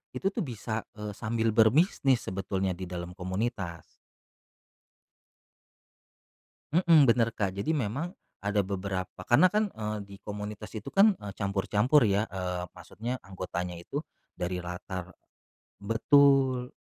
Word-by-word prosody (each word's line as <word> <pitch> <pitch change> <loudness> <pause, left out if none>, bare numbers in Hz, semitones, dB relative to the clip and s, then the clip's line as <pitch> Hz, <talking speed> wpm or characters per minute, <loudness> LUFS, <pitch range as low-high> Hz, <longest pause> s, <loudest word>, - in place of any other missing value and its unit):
itu 195 +1 0
tuh - - -4
bisa, 110 -4 -4
eee, 105 -1 -5
sambil 115 +2 -1
berbisnis 130 - +4
sebetulnya 95 0 -2
di 90 +1 -5
dalam 85 0 -5
komunitas. 95 -2 -3 2.9
Mhm, 165 -3 +6
bener, 115 -2 +3
Kak, 100 -3 0
jadi 100 +8 -5
memang 145 - -2 0.2
ada 100 0 +1
beberapa- 95 -1 -4
karena 175 +9 +6
kan, 210 +1 +2
eee, 105 -1 -3
di 100 - -11
komunitas 105 0 -6
itu 110 -2 -7
kan, 200 +1 +5
eee, 100 -1 -6
campur-campur, 105 +7 +2
ya. 100 +1 +2
Eee, 90 -1 -3
maksudnya 120 +4 -6
anggotanya 90 -2 -4
itu 85 +12 -5 0.4
dari 90 0 -2
latar 90 +1 -6 0.7
betul, 130 +3 +3
105 Hz, 120 wpm, -29 LUFS, 95-125 Hz, 2.9 s, Mhm